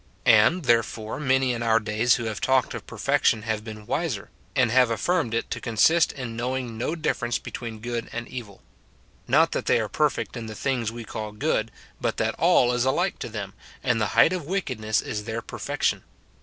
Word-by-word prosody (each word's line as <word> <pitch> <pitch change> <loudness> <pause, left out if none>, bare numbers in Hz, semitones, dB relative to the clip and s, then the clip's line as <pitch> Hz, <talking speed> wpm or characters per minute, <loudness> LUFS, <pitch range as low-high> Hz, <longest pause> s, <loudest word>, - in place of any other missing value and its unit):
And, 115 +11 +5
therefore, 115 -1 +1
many 130 -3 +2
in 120 - -4
our 115 -1 +3
days 110 +2 +2
wlio 120 - -4
have 110 -2 -4
talked 130 -1 +2
of - - -7
perfection 115 -1 +1
have 110 -1 -2
been 110 -1 -9
wiser, 140 - -2 0.2
and 130 -5 +3
have 125 0 +5
affirmed 130 0 0
it 115 - -2
to - - -3
consist 155 +9 +3
in 125 -4 -6
knowing 125 0 -3
no 120 +8 -2
difference 120 -7 -1
between 115 -2 -7
good 120 0 -4
and 120 +1 -5
evil. 110 -6 -9 0.6
Not - - +4
that - - -3
they - - +4
are - - -1
perfect - - 0
in 115 -1 -5
the 110 - -7
things 120 -2 -1
we 120 0 -7
call 110 -1 -6
good, 115 -2 0 0.3
but - - -1
that - - 0
all 125 0 +4
is 125 -1 +1
alike 175 +8 0
to - - -5
them, 100 -3 -6 0.3
and 120 -4 +1
the 105 - +2
height 170 - +6
of 175 -6 -4
wickedness 130 - -1
is 105 -1 -4
their 115 0 -4
perfection. - - -2
120 Hz, 195 wpm, -25 LUFS, 110-130 Hz, 0.6 s, height